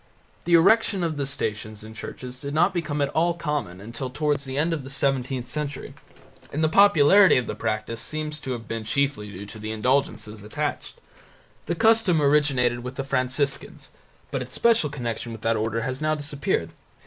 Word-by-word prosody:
The 170 0 +5
erection 195 +2 +4
of 165 -2 -1
the 140 -1 -2
Stations 110 -5 -4
in 110 +1 -10
churches 125 +3 -8
did 140 +2 -5
not 175 +5 +3
become 150 -4 -1
at 140 - 0
all 170 +3 +1
common 150 - -3
until 115 +5 -5
towards 145 +1 -1
the 135 0 -5
end 165 +3 +1
of 150 -4 -3
the 135 - -9
seventeenth 135 -2 -1
century, 145 -1 -5 0.6
and 155 +3 -1
the 155 - +3
popularity 195 +1 +6
of 125 - 0
the - - -4
practice 110 +1 -3
seems 155 0 -3
to 135 -3 -4
have 115 -2 -7
been 115 -1 -4
chiefly 115 -2 -1
due 100 +1 -8
to 110 +2 -9
the 110 0 -5
indulgences 110 -2 -1
attached. 105 - -4 0.7
The 170 - 0
custom 220 -3 +4
originated 140 -4 +3
with 125 +2 -7
the 135 - -3
Franciscans, 135 +1 -1 0.4
but 135 - -2
its 130 0 -6
special 230 -10 +3
connection 120 -4 -4
with 115 - -9
that 115 0 +1
order 110 +1 -1
has 130 +3 -4
now 155 0 +1
disappeared. 145 -1 -2
140 Hz, 185 wpm, -25 LUFS, 115-155 Hz, 0.7 s, popularity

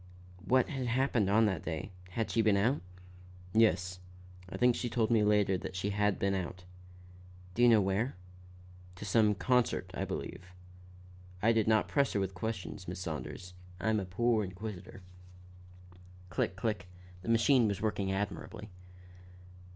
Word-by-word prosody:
"What 130 -1 +3
had 135 -4 -3
happened 120 -4 +1
on 110 +3 +5
that 100 -3 0
day? 90 +4 -4 0.2
Had 110 +5 -2
she 115 - +3
been 110 -2 +3
out?" 120 +8 +2 0.7
"Yes, 90 -5 +3 0.5
I - - -6
think 125 -1 +4
she 120 - -2
told 115 0 +1
me 110 -2 +4
later 105 -3 +3
that 90 - -7
she 95 +2 -1
had 105 0 +1
been 100 0 0
out." 90 -1 -4 0.9
"Do 120 - -1
you 120 - +7
know 110 -3 +6
where?" 100 +7 0 0.8
"To 105 - -8
some 105 +1 +3
concert, 125 +3 +1
I - - -2
believe. 85 +1 -5 1.0
I 110 +5 +4
did 110 -2 +2
not 110 -1 +3
press 140 -1 +1
her 100 - +1
with 95 -1 -2
questions, 95 -1 -5
Miss 90 0 -5
Saunders; 85 +2 -6 0.3
I 110 +5 +1
am 110 - +2
a 95 - -3
poor 110 +4 +1
inquisitor." 95 0 -7 1.3
Click, 85 +2 -1
click; 105 -2 -2 0.3
the 105 - -6
machine 115 +1 +4
was 100 -1 -1
working 100 -2 -1
admirably. 105 +1 -4
105 Hz, 160 wpm, -32 LUFS, 95-115 Hz, 1.3 s, you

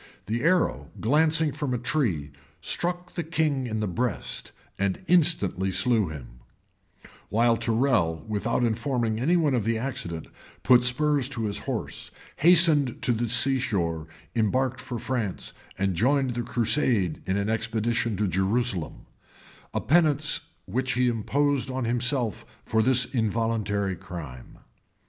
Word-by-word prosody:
The 115 +5 -2
arrow, 165 - +1
glancing 155 +5 +2
from 140 -3 -2
a - - 0
tree, 110 - -1 0.3
struck 175 0 -2
the 175 - -2
king 155 -5 0
in 110 -1 -2
the 105 - -1
breast, 115 +5 -2 0.3
and 100 - -1
instantly 150 - +2
slew 110 +2 +2
him;[*] 65 -6 -9 0.9
while 115 +2 +3
Tyrrel, 115 - +1
without 110 +3 -1
informing 115 -1 0
any 165 +9 +3
one 155 -5 +2
of 120 -4 +1
the 115 +2 0
accident, 110 -10 -4 0.4
put 125 -1 +6
spurs 140 +1 +2
to 125 -4 -3
his 105 -1 -2
horse, - - -4 0.3
hastened 155 -5 +5
to - - +3
the 120 0 -1
sea 130 +3 +2
shore, 85 -10 -2 0.3
embarked 130 +3 0
for 130 -2 -5
France, 115 -5 -3 0.2
and 95 0 0
joined 130 - +2
the 120 0 -2
crusade 115 - +1
in 95 +1 +1
an 100 0 -1
expedition 115 0 -1
to 105 +1 +1
Jerusalem; 95 0 -1 0.7
a - - -2
penance 155 -1 +2 0.2
which 130 +6 -1
he 125 0 +2
imposed 135 +4 0
on 130 -1 -2
himself 120 -2 0 0.2
for 110 - +2
this 125 +1 +3
involuntary 110 -4 -1
crime. 80 -9 -9
120 Hz, 140 wpm, -26 LUFS, 105-135 Hz, 0.9 s, put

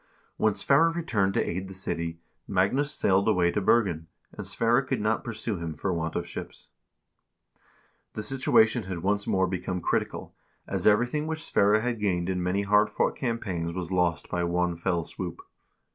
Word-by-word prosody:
When 110 -2 +2
Sverre 140 +4 +4
re 170 +1 -3
turned 100 -10 0
to - - +1
aid 95 +2 -3
the 95 - -9
city, 85 -3 -3 0.3
Magnus 100 +10 +1
sailed 95 +1 +2
away 90 -5 +3
to 105 - -1
Bergen, 95 -7 +2 0.2
and - - -7
Sverre 115 +3 +2
could 135 - -2
not 110 +1 0
pursue 115 -2 -3
him 85 -2 -5
for 90 +5 -2
want 80 -1 -3
of - - -1
ships. - - -8 1.4
The 110 - -4
situation 115 -2 +3
had 90 -3 -5
once 100 +1 0
more 95 0 +2
become 90 0 -3
critical, - - -2 0.3
as - - -1
everything 125 +8 +2
which 160 0 -2
Sverre 105 -4 +3
had 120 -1 -2
gained 90 -3 0
in 90 -1 -2
many 90 +3 0
hard 105 +1 +4
fought - - 0
campaigns 95 -9 -3
was 90 0 -5
lost 90 -3 +1
by 90 - -2
one 90 0 0
fell 85 0 -1
swoop. - - -6
95 Hz, 175 wpm, -27 LUFS, 90-115 Hz, 1.4 s, Sverre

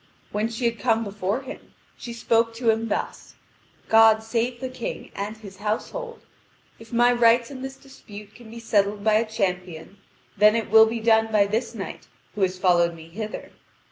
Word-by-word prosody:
When 215 +2 -1
she 230 +2 -4
had 230 -1 0
come 220 +3 +1
before 205 +3 -3
him, 265 - -11 0.2
she 240 - -8
spoke 230 0 +1
to 230 -1 +2
him 225 +1 -2
thus: 210 - -4 0.5
"God 220 0 +5
save 240 +2 -2
the 260 - -4
King 255 -2 -7
and 205 +2 -5
his 200 -3 -12
household. 465 - -4 0.6
If 225 0 -15
my 240 +1 +4
rights 235 +1 +3
in 260 -2 -8
this 265 0 -6
dispute 210 -7 -13
can 235 -1 -14
be 230 +1 -9
settled 205 -2 0
by 215 0 +3
a 220 +1 +2
champion, 180 -4 -3 0.4
then 210 +1 +5
it 225 -3 -2
will 220 0 +8
be 230 0 -3
done 220 0 +3
by 210 -2 +4
this 215 +4 -2
knight - - -7 0.3
who 210 - -6
has 185 -1 +1
followed 175 -2 +2
me 165 0 -13
hither. 215 +5 -7
220 Hz, 185 wpm, -24 LUFS, 205-235 Hz, 0.6 s, will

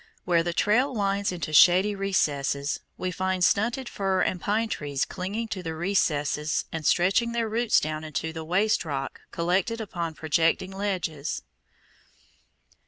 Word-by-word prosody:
Where 170 -2 +3
the 170 +1 -1
trail 240 - +2
winds 200 -1 0
into 165 -4 -5
shady 185 +6 +6
recesses, 145 -8 0 0.2
we 185 - -2
find 185 0 -1
stunted 235 +7 +2
fir 195 -3 0
and 180 - -1
pine 220 +5 0
trees 145 -9 -2
clinging 200 +5 -4
to 190 - -4
the 165 -2 -4
crevices 155 -4 0
and 160 -1 -4
stretching 195 +7 +3
their 230 -1 0
roots 225 +1 +2
down 155 0 -3
into 160 +1 -4
the 160 0 -5
waste 195 +7 +1
rock 140 -4 -4
collected 190 +7 0
upon 170 -7 -4
projecting 165 +4 +1
ledges. 185 -7 -3
185 Hz, 145 wpm, -26 LUFS, 160-205 Hz, 0.2 s, shady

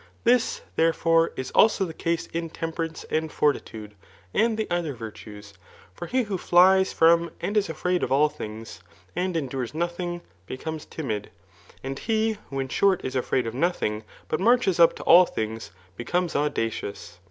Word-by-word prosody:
This, 245 0 +2
therefore, 165 0 +3
is 130 0 -5
also 215 -3 +4
the 165 - -7
case 165 +1 -2
ia 165 0 -3
temperance 165 0 -4
and 160 0 -1
fortitude, 110 -7 -1 0.4
and 225 0 +2
the 220 - -2
other 170 -5 -1
virtues. 105 -2 -10 0.4
For 175 - -7
he 255 +5 +1
who 200 -4 -4
flies 190 +2 +5
from 170 +1 +4
and 205 - -3
is 205 -3 +2
afraid 180 +3 -1
of - - -2
all 145 +3 +5
things, 110 -6 -8 0.3
and 180 -1 -1
endures 130 -4 -3
aothing, 175 +1 -3 0.3
becomes 155 +4 -6
timid; 110 -10 -5 0.5
and 135 +1 -5
he 220 -1 0
who 135 - -4
in 135 -1 -3
short 195 +5 +2
is 130 - -4
afraid 125 -1 0
of 115 - -4
nothing, 120 -8 -1 0.2
but - - -1
marches 220 -4 +3
up 170 - +6
to - - -8
all 175 +1 +7
things, 110 +1 -4 0.3
becomes 175 - -2
auda 150 +1 +2 0.2
doos. 95 -5 -8
165 Hz, 165 wpm, -25 LUFS, 130-180 Hz, 0.5 s, all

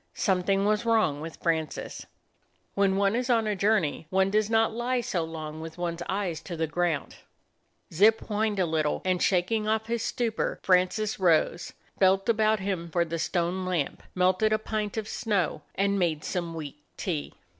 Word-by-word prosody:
Something 195 +1 +1
was 215 +2 +2
wrong 220 -11 +2
with 160 +1 -7
Francis. 160 -3 -2 0.7
When 195 -1 +2
one 200 +2 +2
is 250 +1 -1
on 230 -2 +3
a 210 -1 0
journey 195 -6 +1
one 190 +1 +2
does 215 0 +2
not 225 0 +3
lie 245 +2 0
so 180 -7 -1
long 155 -1 -6
with 160 +1 -8
one's 175 -1 -3
eyes 185 -5 -2
to 170 0 -7
the 160 - +1
ground. 160 -2 -2 0.8
Zip 215 +6 +5
whined 210 -1 -1
a 185 - +2
little; 155 -2 0
and 185 -1 +1
shaking 200 +4 +1
off 220 0 +1
his 230 0 -2
stupor, 225 -1 -1
Francis 185 +4 +2
rose, 170 -1 +2 0.3
felt 190 0 +4
about 220 -1 +3
him 185 -3 -3
for 170 +1 +1
the 165 0 -4
stone 175 +2 -1
lamp, 180 -6 -2
melted 185 +4 +3
a 215 - +4
pint 215 -1 -3
of 215 -1 -2
snow, 195 -10 -1
and 200 +1 +1
made 160 -4 0
some 170 -3 -3
weak 150 -2 -7 0.2
tea. 160 -6 -3
190 Hz, 175 wpm, -27 LUFS, 170-215 Hz, 0.8 s, Zip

